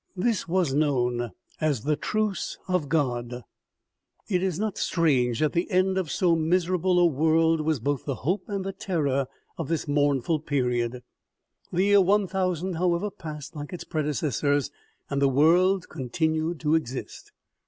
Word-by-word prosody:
This 220 Hz, 0 st, 0 dB
was 170 Hz, -5 st, +1 dB
known 125 Hz, -5 st, +1 dB, 0.3 s
as 145 Hz, -8 st, 0 dB
the 150 Hz, +1 st, +1 dB
truce 215 Hz, +4 st, -2 dB
of 180 Hz, -6 st, 0 dB
God. 125 Hz, -5 st, -1 dB, 0.8 s
It 180 Hz, -3 st, +1 dB
is 185 Hz, -4 st, -1 dB
not 215 Hz, 0 st, -2 dB
strange 130 Hz, -8 st, +1 dB
that 155 Hz, -, +2 dB
the 170 Hz, +1 st, 0 dB
end 185 Hz, 0 st, +2 dB
of 185 Hz, -5 st, -1 dB
so 175 Hz, 0 st, +2 dB
miserable 180 Hz, +2 st, +1 dB
a 175 Hz, -, +5 dB
world 160 Hz, +1 st, +3 dB
was 155 Hz, -2 st, 0 dB
both 140 Hz, +4 st, -2 dB
the 140 Hz, -, -2 dB
hope 180 Hz, +12 st, -2 dB
and 200 Hz, -2 st, -3 dB
the 195 Hz, -, -3 dB
terror 145 Hz, -10 st, -1 dB, 0.3 s
of 165 Hz, -, -3 dB
this 165 Hz, 0 st, -2 dB
mournful 145 Hz, +1 st, +1 dB
period. 125 Hz, -4 st, -1 dB, 0.7 s
The 180 Hz, +1 st, +1 dB
year 200 Hz, 0 st, +5 dB
1000, 185 Hz, -2 st, 0 dB
however, 180 Hz, +3 st, 0 dB
passed 150 Hz, -4 st, -8 dB
like 150 Hz, +3 st, -7 dB
its 180 Hz, -, -5 dB
predecessors, 145 Hz, -2 st, 0 dB, 0.4 s
and 140 Hz, 0 st, -2 dB
the 140 Hz, -, +4 dB
world 175 Hz, +7 st, +3 dB
continued 160 Hz, +5 st, -1 dB
to 150 Hz, -1 st, +1 dB
exist. 135 Hz, -5 st, -3 dB
160 Hz, 155 wpm, -26 LUFS, 140-180 Hz, 0.8 s, a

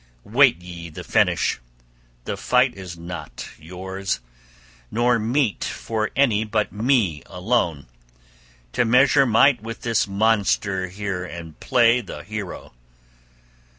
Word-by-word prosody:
Wait 125 Hz, -3 st, +4 dB
ye 85 Hz, -1 st, -8 dB
the 75 Hz, -, -9 dB
finish. -, -, +1 dB, 0.7 s
The -, -, -2 dB
fight 125 Hz, 0 st, +2 dB
is 90 Hz, -5 st, -9 dB
not 85 Hz, +2 st, -7 dB
yours, 95 Hz, +4 st, -4 dB, 0.7 s
nor 120 Hz, +1 st, +2 dB
meet 115 Hz, +1 st, 0 dB
for 110 Hz, -1 st, -2 dB
any 115 Hz, -6 st, +3 dB
but 105 Hz, -1 st, -1 dB
me 105 Hz, -, +1 dB
alone 90 Hz, -, -1 dB, 0.9 s
to -, -, +2 dB
measure 130 Hz, +3 st, +5 dB
might 120 Hz, +2 st, +4 dB
with 115 Hz, +1 st, -7 dB
this 115 Hz, -3 st, +1 dB
monster 100 Hz, -2 st, +1 dB
here 95 Hz, 0 st, -4 dB
and 85 Hz, -3 st, -9 dB
play 120 Hz, 0 st, +3 dB
the 100 Hz, -, -9 dB
hero. 105 Hz, -9 st, -7 dB
105 Hz, 120 wpm, -23 LUFS, 90-120 Hz, 0.9 s, measure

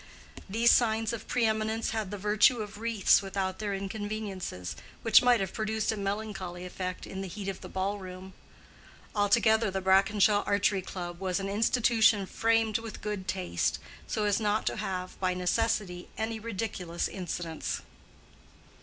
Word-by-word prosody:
These 230 Hz, +4 st, +4 dB
signs 225 Hz, -1 st, +3 dB
of 225 Hz, -, -6 dB
pre 245 Hz, -2 st, +1 dB
eminence 220 Hz, +1 st, 0 dB
had 220 Hz, -3 st, -2 dB
the 205 Hz, -, -5 dB
virtue 210 Hz, +5 st, +4 dB
of 210 Hz, 0 st, -10 dB
wreaths 225 Hz, -4 st, +4 dB
without 190 Hz, -1 st, -3 dB
their 205 Hz, -2 st, -2 dB
inconveniences, 195 Hz, -, -4 dB, 0.3 s
which 225 Hz, -, +7 dB
might 245 Hz, -2 st, +5 dB
have 190 Hz, -1 st, -3 dB
produced 220 Hz, 0 st, -1 dB
a -, -, -2 dB
melancholy 195 Hz, -3 st, -4 dB
effect 185 Hz, 0 st, -5 dB
in 190 Hz, -, -6 dB
the 195 Hz, -, -4 dB
heat 195 Hz, +2 st, -6 dB
of 195 Hz, -, -4 dB
the -, -, -8 dB
ball 195 Hz, +2 st, -2 dB
room. 185 Hz, 0 st, -9 dB, 0.8 s
Altogether 220 Hz, +1 st, +4 dB
the 190 Hz, 0 st, -2 dB
Brackenshaw 200 Hz, +2 st, +4 dB
Archery 200 Hz, -1 st, +2 dB
Club 175 Hz, -2 st, -6 dB
was 185 Hz, 0 st, -1 dB
an 195 Hz, 0 st, -3 dB
institution 220 Hz, -1 st, +3 dB
framed 225 Hz, +1 st, +1 dB
with 225 Hz, -1 st, -8 dB
good 205 Hz, -3 st, -4 dB
taste, 185 Hz, -2 st, -1 dB, 0.3 s
so 215 Hz, -, -1 dB
as 205 Hz, 0 st, +2 dB
not 210 Hz, 0 st, +1 dB
to -, -, -1 dB
have 185 Hz, -1 st, -4 dB
by 185 Hz, -1 st, 0 dB
necessity 180 Hz, -1 st, 0 dB
any 220 Hz, +1 st, -2 dB
ridiculous 195 Hz, -6 st, -3 dB
incidents. 175 Hz, -3 st, -4 dB
205 Hz, 155 wpm, -29 LUFS, 190-220 Hz, 0.8 s, which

